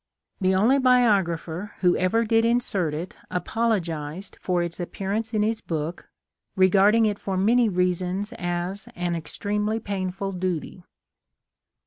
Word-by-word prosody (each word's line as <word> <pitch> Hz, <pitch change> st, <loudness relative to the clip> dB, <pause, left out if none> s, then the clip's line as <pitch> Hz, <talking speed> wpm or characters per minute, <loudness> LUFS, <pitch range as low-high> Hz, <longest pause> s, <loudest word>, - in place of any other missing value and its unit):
The 190 Hz, -1 st, +2 dB
only 235 Hz, +9 st, +4 dB
biographer 205 Hz, -7 st, +2 dB
who 180 Hz, -2 st, +4 dB
ever 225 Hz, +6 st, +2 dB
did 225 Hz, +1 st, +3 dB
insert 210 Hz, -9 st, +1 dB
it 170 Hz, +4 st, -6 dB
apologized 180 Hz, -4 st, -2 dB
for 180 Hz, -2 st, 0 dB
its 170 Hz, +1 st, -6 dB
appearance 200 Hz, +5 st, -3 dB
in 215 Hz, -2 st, +1 dB
his 220 Hz, +1 st, -1 dB
book, 160 Hz, +1 st, -4 dB, 0.5 s
regarding 200 Hz, +4 st, +5 dB
it 205 Hz, -1 st, 0 dB
for 190 Hz, -1 st, -3 dB
many 230 Hz, +4 st, +4 dB
reasons 185 Hz, +3 st, -1 dB
as 175 Hz, +5 st, -3 dB
an 175 Hz, -1 st, -1 dB
extremely 210 Hz, +6 st, -2 dB
painful 195 Hz, -2 st, -3 dB
duty. 180 Hz, -1 st, -3 dB
190 Hz, 125 wpm, -25 LUFS, 175-215 Hz, 0.5 s, regarding